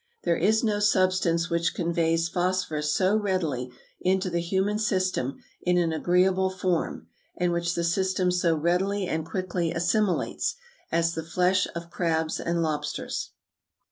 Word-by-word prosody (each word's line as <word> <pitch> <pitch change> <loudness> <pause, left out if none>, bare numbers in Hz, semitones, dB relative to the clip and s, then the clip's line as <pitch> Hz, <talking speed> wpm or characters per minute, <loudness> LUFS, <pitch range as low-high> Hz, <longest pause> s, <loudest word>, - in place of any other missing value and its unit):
There 170 - +2
is 220 +7 +2
no 210 -2 +1
substance 185 -4 +2
which 170 0 0
conveys 165 -1 +1
phosphorus 175 -4 -1
so 190 +5 +2
readily 170 - -1 0.3
into 185 0 +1
the 170 0 0
human 190 +4 0
system 185 - 0 0.2
in 180 0 +2
an 170 -2 +1
agreeable 185 +3 +2
form, 185 -2 -2 0.3
and 180 0 +1
which 170 0 -1
the 170 - -1
system 185 +1 +1
so 175 -2 +2
readily 185 +5 +1
and 160 -2 -1
quickly 180 -1 -2
assimilates, 190 - 0 0.4
as 165 0 +2
the 160 - -3
flesh 180 +4 +1
of 170 0 -6
crabs 160 -2 0
and 170 0 0
lobsters." 150 -1 -3
175 Hz, 140 wpm, -26 LUFS, 165-190 Hz, 0.4 s, There